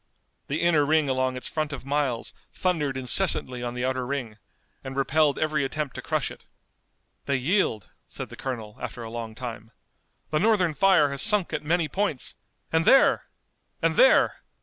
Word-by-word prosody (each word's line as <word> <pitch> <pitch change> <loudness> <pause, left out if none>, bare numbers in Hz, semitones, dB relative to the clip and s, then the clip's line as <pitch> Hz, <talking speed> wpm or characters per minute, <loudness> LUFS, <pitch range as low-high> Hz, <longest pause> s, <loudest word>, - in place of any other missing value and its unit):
The 145 +3 -2
inner 170 -3 +3
ring 155 0 +2
along 130 0 0
its 130 - -6
front 155 -1 -2
of 140 -2 -7
miles 140 -4 -1 0.2
thundered 150 -7 -1
incessantly 130 -2 +1
on 120 0 -4
the 125 +1 -2
outer 130 0 -1
ring, 125 -5 -4 0.4
and 130 -1 -7
repelled 145 +2 +2
every 155 -2 0
attempt 140 0 -3
to - - -7
crush - - -2
it. - - -13 0.8
"They 140 - +1
yield," 130 - 0 0.2
said - - -7
the - - -10
colonel, 115 -5 -6
after 120 - -6
a 110 - -8
long 115 -1 -6
time. 115 -3 -7 0.6
"The 155 - +1
Northern 185 -5 +2
fire 150 -2 +4
has 140 - 0
sunk 210 -5 +4
at - - -1
many 165 +1 +1
points, 175 -4 -2 0.4
and 160 0 +3
there! 270 - +5 0.5
and - - +1
there! - - +5
140 Hz, 170 wpm, -25 LUFS, 125-160 Hz, 0.8 s, there